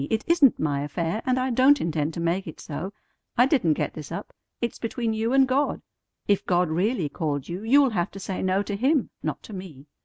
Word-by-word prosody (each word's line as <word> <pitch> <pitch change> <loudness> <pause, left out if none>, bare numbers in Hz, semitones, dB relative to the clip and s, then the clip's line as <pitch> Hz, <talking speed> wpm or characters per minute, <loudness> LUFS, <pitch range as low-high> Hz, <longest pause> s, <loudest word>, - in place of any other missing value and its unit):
It 220 0 0
isn't 330 -7 +5
my 145 -2 0
affair, 165 +7 -2
and 255 0 +2
I 255 0 0
don't 265 +4 +5
intend 155 -1 -1
to - - -4
make 170 +3 -1
it 160 - -8
so. 160 +6 -5 0.5
I 245 - +7
didn't 255 - +3
get - - -2
this 155 -1 -8
up. 170 - -6 0.3
It's 235 - -3
between 230 0 -2
you 220 +2 -1
and 270 0 +5
God. 275 +3 0 0.4
If 200 -1 +2
God 180 -1 +2
really 185 +1 +1
called 145 -2 -3
you, 175 +3 -5
you'll 265 +4 +4
have 180 -2 0
to 195 - -8
say 190 0 -4
no 190 +2 +1
to 205 - -4
Him, 265 +5 +1
not - - -4
to 215 - -10
me. 175 -8 -9
195 Hz, 220 wpm, -25 LUFS, 165-250 Hz, 0.5 s, I